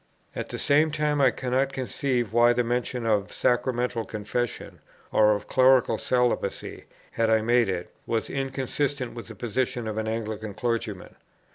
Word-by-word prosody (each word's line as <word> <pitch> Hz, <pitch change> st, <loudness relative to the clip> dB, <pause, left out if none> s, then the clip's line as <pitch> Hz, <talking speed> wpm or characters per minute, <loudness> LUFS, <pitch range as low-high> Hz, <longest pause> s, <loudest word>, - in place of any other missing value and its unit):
At -, -, -4 dB
the -, -, -5 dB
same 150 Hz, +2 st, +3 dB
time 150 Hz, -1 st, 0 dB
I 135 Hz, -, +6 dB
cannot 130 Hz, +2 st, -1 dB
conceive 125 Hz, -3 st, -2 dB
why 120 Hz, +1 st, +5 dB
the 125 Hz, 0 st, +1 dB
mention 120 Hz, 0 st, -2 dB
of 105 Hz, -3 st, +1 dB
Sacramental 120 Hz, -1 st, 0 dB
Confession, 110 Hz, +3 st, -4 dB, 0.3 s
or 105 Hz, -1 st, +5 dB
of 105 Hz, -, -7 dB
Clerical 130 Hz, -3 st, +4 dB
Celibacy, 125 Hz, -1 st, -1 dB, 0.3 s
had 115 Hz, -1 st, +1 dB
I 110 Hz, 0 st, +4 dB
made 120 Hz, -1 st, +3 dB
it, 90 Hz, -2 st, -4 dB
was 115 Hz, -1 st, -1 dB
inconsistent 135 Hz, 0 st, -2 dB
with 115 Hz, -1 st, -8 dB
the 110 Hz, -, -10 dB
position 120 Hz, +1 st, -2 dB
of 110 Hz, 0 st, -2 dB
an 110 Hz, -, -3 dB
Anglican 110 Hz, -2 st, -4 dB
Clergyman. 115 Hz, -4 st, -3 dB
120 Hz, 155 wpm, -26 LUFS, 110-130 Hz, 0.3 s, I